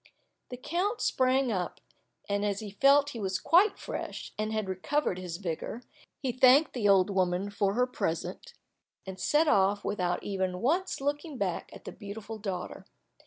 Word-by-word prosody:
The 250 Hz, -, -6 dB
count 365 Hz, -, -1 dB
sprang 260 Hz, 0 st, +2 dB
up, 185 Hz, -4 st, -3 dB, 0.5 s
and 200 Hz, 0 st, 0 dB
as 200 Hz, -1 st, 0 dB
he 210 Hz, -2 st, -7 dB
felt 275 Hz, +7 st, +5 dB
that 290 Hz, -, -6 dB
he 235 Hz, -, -7 dB
was 190 Hz, -2 st, -1 dB
quite 375 Hz, -, +4 dB
fresh, -, -, -6 dB
and 215 Hz, 0 st, -2 dB
had 215 Hz, -2 st, -2 dB
recovered 190 Hz, +3 st, -1 dB
his 175 Hz, -2 st, -5 dB
vigor, 190 Hz, +6 st, -5 dB, 0.4 s
he 260 Hz, -, +1 dB
thanked 255 Hz, +4 st, +5 dB
the 215 Hz, -5 st, +1 dB
old 195 Hz, 0 st, +5 dB
woman 185 Hz, +1 st, 0 dB
for 200 Hz, 0 st, 0 dB
her 250 Hz, +1 st, +3 dB
present, 250 Hz, -, -4 dB, 0.5 s
and 190 Hz, -1 st, -7 dB
set 310 Hz, +2 st, +3 dB
off 200 Hz, -4 st, +3 dB
without 180 Hz, -3 st, -1 dB
even 190 Hz, -2 st, -2 dB
once 335 Hz, -, 0 dB
looking 290 Hz, +1 st, -2 dB
back 185 Hz, -6 st, -2 dB
at -, -, -13 dB
the -, -, -6 dB
beautiful 215 Hz, +1 st, -8 dB
daughter. 190 Hz, -4 st, -5 dB
210 Hz, 170 wpm, -29 LUFS, 190-275 Hz, 0.5 s, felt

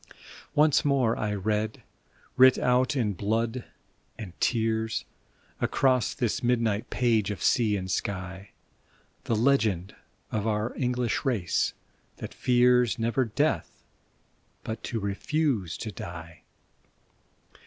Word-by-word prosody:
Once 150 Hz, -1 st, +4 dB
more 135 Hz, -5 st, +2 dB
I 105 Hz, -, -2 dB
read, 105 Hz, +2 st, -2 dB, 0.5 s
writ 130 Hz, 0 st, +7 dB
out 125 Hz, +2 st, +2 dB
in 110 Hz, -6 st, 0 dB
blood 115 Hz, +6 st, -1 dB, 0.5 s
and 95 Hz, -6 st, -8 dB
tears, 110 Hz, -1 st, 0 dB, 0.5 s
Across 130 Hz, -4 st, +1 dB
this 120 Hz, -3 st, -1 dB
midnight 115 Hz, -4 st, 0 dB
page 115 Hz, -5 st, +1 dB
of 100 Hz, -3 st, -4 dB
sea 110 Hz, -4 st, +3 dB
and 95 Hz, -1 st, -4 dB
sky, 95 Hz, +1 st, -4 dB, 0.8 s
The 115 Hz, -, 0 dB
legend 110 Hz, -7 st, +1 dB, 0.4 s
of 110 Hz, 0 st, -1 dB
our 110 Hz, +2 st, -1 dB
English 125 Hz, -2 st, -1 dB
race 115 Hz, -, 0 dB, 0.4 s
that -, -, -7 dB
fears, 125 Hz, -3 st, +3 dB
never 120 Hz, +3 st, +1 dB
death, 115 Hz, -, -1 dB, 0.8 s
but 110 Hz, 0 st, -5 dB
to 115 Hz, -, -3 dB
refuse 105 Hz, -, -1 dB
to 110 Hz, -, -5 dB
die 85 Hz, -2 st, -9 dB
115 Hz, 110 wpm, -27 LUFS, 105-125 Hz, 0.8 s, writ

